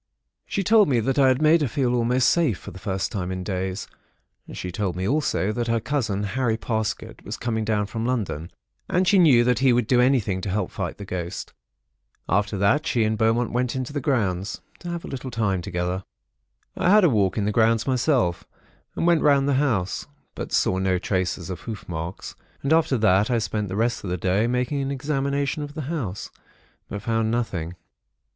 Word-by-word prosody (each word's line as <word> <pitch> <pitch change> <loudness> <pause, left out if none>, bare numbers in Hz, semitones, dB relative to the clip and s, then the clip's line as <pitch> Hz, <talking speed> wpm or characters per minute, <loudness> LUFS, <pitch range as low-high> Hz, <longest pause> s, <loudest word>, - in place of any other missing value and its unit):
She 195 - -1
told 215 +2 +5
me 125 -4 +3
that 135 +5 0
I 135 - +6
had 130 +3 +2
made 160 +2 +5
her 145 - +2
feel 125 +1 0
almost 125 +1 +2
safe, 155 - +2
for 100 - -10
the 95 - -11
first 95 -1 -2
time 95 -5 -3
for 95 - -2
days. 95 +1 -3 0.6
She 90 - -5
told 95 -2 -2
me 95 +1 -2
also 135 -7 +1
that 120 +2 -2
her 115 0 +1
cousin, 110 -6 -1
Harry 115 +2 0
Parsket, 110 -1 -3
was - - -5
coming 110 -2 -2
down 105 -1 0
from 110 +2 -4
London, 105 -10 -2 0.4
and 180 +1 +2
she 195 +1 +5
knew 135 -9 +6
that 125 -2 +2
he 130 -1 +4
would 120 -1 +2
do 125 +2 +3
anything 120 -8 +2
to 100 - -4
help 95 -1 -1
fight - - -4
the 100 - -8
ghost. 90 -2 -5 0.7
And - - +1
after 100 0 -1
that 100 +11 +2
she 120 -4 +2
and 110 0 +1
Beaumont 115 +2 +1
went 125 0 0
out - - -8
into 130 +1 -4
the 145 - -2
grounds, 100 - -1 0.2
to 175 - -7
have 170 -1 -4
a - - -7
little 135 -1 -5
time 105 -6 0
together. 90 +1 -3 0.7
"I - - +1
had 210 +1 +6
a - - +7
walk 100 - +1
in 105 - +1
the 105 - +1
grounds 115 +1 +3
myself, 125 - +1 0.5
and - - -1
went 170 -2 +4
round 140 -2 +4
the 140 - +2
house, 105 -11 -1 0.3
but - - -6
saw 95 - +2
no 95 -1 +1
traces 90 -1 -2
of 90 - -5
hoof 110 -2 -7
marks; 85 +1 -5 0.3
and 140 +3 +2
after 160 -5 +3
that, 105 -2 +3
I 120 - +2
spent 105 -2 -2
the 95 - -4
rest 115 +2 0
of 95 - -4
the 90 - -1
day, 95 +6 +1
making 125 +3 0
an 135 - -2
examination 140 +1 -1
of 145 0 -7
the 155 - -3
house; 110 - -4 0.6
but 100 0 -6
found 115 -1 0
nothing. 95 -8 -2
115 Hz, 210 wpm, -24 LUFS, 95-135 Hz, 0.7 s, a